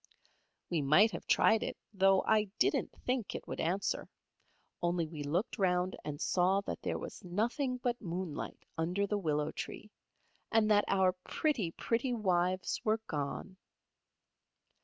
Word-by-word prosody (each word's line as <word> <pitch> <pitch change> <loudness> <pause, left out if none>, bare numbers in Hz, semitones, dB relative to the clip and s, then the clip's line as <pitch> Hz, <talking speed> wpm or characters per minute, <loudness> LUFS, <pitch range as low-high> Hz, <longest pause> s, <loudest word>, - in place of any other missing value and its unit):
We 165 -3 +1
might 170 +11 +5
have - - -7
tried 220 0 +4
it, - - -3 0.2
though 195 -1 +4
I 215 -1 +3
didn't - - +2
think 250 -4 -1
it - - -6
would - - -5
answer; 185 +5 -1 0.7
only 175 -1 +1
we 155 -1 -7
looked 175 - -1
round 180 -1 +2
and 145 -1 -5
saw 185 +3 +2
that - - -5
there - - -1
was - - -8
nothing 240 - -1
but 245 -1 -2
moonlight 175 -4 -5
under 180 +5 +1
the 205 +1 -1
willow 150 -3 0
tree, 210 - -7 0.6
and 220 -1 +4
that 205 0 +5
our 190 -1 +4
pretty, 270 - 0
pretty 240 +8 -1
wives 185 -3 +1
were 215 -1 +2
gone. 150 +5 -4
190 Hz, 145 wpm, -33 LUFS, 175-215 Hz, 0.7 s, might